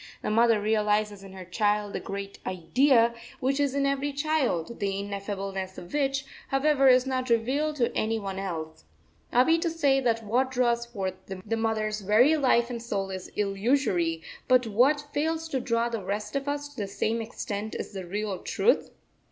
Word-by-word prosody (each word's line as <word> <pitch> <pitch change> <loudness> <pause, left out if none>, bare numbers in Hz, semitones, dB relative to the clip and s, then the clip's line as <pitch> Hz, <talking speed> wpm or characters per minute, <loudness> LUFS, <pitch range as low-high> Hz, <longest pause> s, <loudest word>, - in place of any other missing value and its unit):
The - - -1
mother 230 0 +4
realises 210 -1 +1
in 195 -1 -11
her 190 -1 -9
child 210 0 0
the - - -2
great 200 0 -6
Idea, 235 - +3 0.3
which 270 +2 0
is 280 -1 +1
in 280 0 +1
every 275 +1 0
child, 280 - -1
the 195 -2 -1
ineffableness 195 -1 -4
of 175 - -10
which, 275 -1 0 0.2
however, 275 0 +3
is 255 0 +6
not 260 -1 -2
revealed 265 +7 +1
to 245 -5 0
any 225 +1 0
one 195 -3 -4
else. 160 - -5 0.5
Are 250 +1 +5
we 330 0 +4
to 335 - 0
say 290 -5 +2
that 230 -3 0
what 250 +5 +1
draws 240 -2 +1
forth 195 -6 -3
the 195 +3 -4
mother's 215 -1 -1
very 225 +10 +5
life 250 -4 +2
and 235 -1 -4
soul 195 -4 -3
is 185 -1 -6
illusory, 195 - +1 0.2
but 255 -1 +4
what 265 +7 +3
fails 320 +2 -1
to 270 - -1
draw 230 -1 0
the 230 -3 -3
rest 210 +3 -4
of 275 0 -2
us 290 0 -2
to 290 - -19
the 200 - -2
same 220 +3 -1
extent 215 -2 -5
is - - -5
the 190 -1 -5
real 205 0 -3
truth? 475 - +1
230 Hz, 185 wpm, -27 LUFS, 200-270 Hz, 0.5 s, is